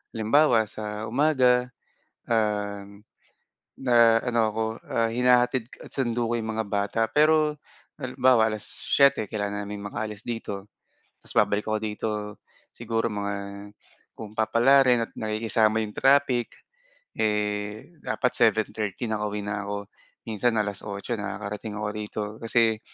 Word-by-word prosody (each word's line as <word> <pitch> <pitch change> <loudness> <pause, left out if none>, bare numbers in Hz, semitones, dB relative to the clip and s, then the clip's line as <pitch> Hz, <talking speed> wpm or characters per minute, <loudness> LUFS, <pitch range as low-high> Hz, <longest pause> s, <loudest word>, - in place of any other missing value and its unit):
Halimbawa 115 +1 +4
sa 105 0 -5
umaga, 125 0 +3 0.6
um, 105 -2 -1 0.8
ah, 115 -2 +5
ano 115 - +1
ako, 110 +1 -2 0.2
ah, 115 0 0
hinahatid 125 0 +3 0.2
sundo 120 -3 0
ko 120 - 0
'yong 110 -1 -4
mga 110 - 0
bata, 100 +2 0
pero 150 0 +3 0.4
halimbawa 125 -3 +3
7:00, 110 +3 +1
kailangan 100 -1 -3
naming 105 0 -6
maka-alis 105 +1 -5
dito. 105 -4 -5 0.5
Tapos - - -1
babalik 105 0 +2
ako 110 0 0
dito, 110 0 -3 0.7
siguro 115 0 -1
mga 100 -1 -3 0.8
kung 110 -1 -10
papalarin 120 +1 +4
at - - -27
nakikisama 110 0 +1
'yong 105 -1 -6
traffic, 135 -3 +3 0.6
eh, 105 +5 -2
dapat 125 - -1
7:30 110 -1 0
nakauwi 105 -2 -2
na 105 0 -2
ako, 100 0 -4 0.4
minsan 115 +2 0
8:00 105 +1 -3
nakakarating 105 +1 -5
ako 105 0 -3
rito 105 0 -5 0.2
kasi 115 -1 +2
110 Hz, 120 wpm, -26 LUFS, 105-120 Hz, 0.8 s, ah